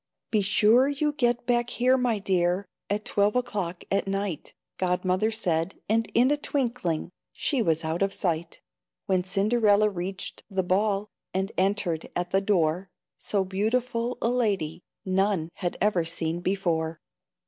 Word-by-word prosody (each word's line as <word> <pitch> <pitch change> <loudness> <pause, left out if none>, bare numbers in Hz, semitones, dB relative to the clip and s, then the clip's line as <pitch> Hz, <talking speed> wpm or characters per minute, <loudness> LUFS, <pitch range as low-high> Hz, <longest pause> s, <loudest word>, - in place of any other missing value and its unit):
"Be 215 - +3
sure 215 +6 +4
you 290 +1 0
get 240 -4 +1
back 240 -1 +1
here, 250 +2 +3
my 250 -4 +1
dear, 185 -1 +1 0.2
At 210 +1 -1
twelve 205 +2 +2
o'clock 200 -8 -2
at 195 0 +1
night," 195 -4 -3 0.2
Godmother 185 +3 +1
said, 185 -5 -1
and 225 +1 +1
in 250 +4 +5
a 295 - +2
twinkling 240 - -1 0.2
She 275 -5 0
was 165 -5 +1
out 160 +3 -2
of 195 0 +2
sight. 170 -3 -2 0.4
When 185 -2 +1
Cinderella 210 +2 +3
reached 185 +1 -5
the 190 -2 0
ball, 200 +2 +1 0.2
And 190 +2 0
entered 185 -4 0
at 175 0 -2
the 195 - +3
door, 180 -2 +1 0.3
So 200 -2 0
beautiful 230 +5 -1
a 230 - +3
lady 200 -10 0 0.2
None 190 -3 +1
had 175 -3 -3
ever 205 -5 +2
seen 165 0 -2
before. 170 -4 -1
195 Hz, 150 wpm, -27 LUFS, 180-225 Hz, 0.4 s, in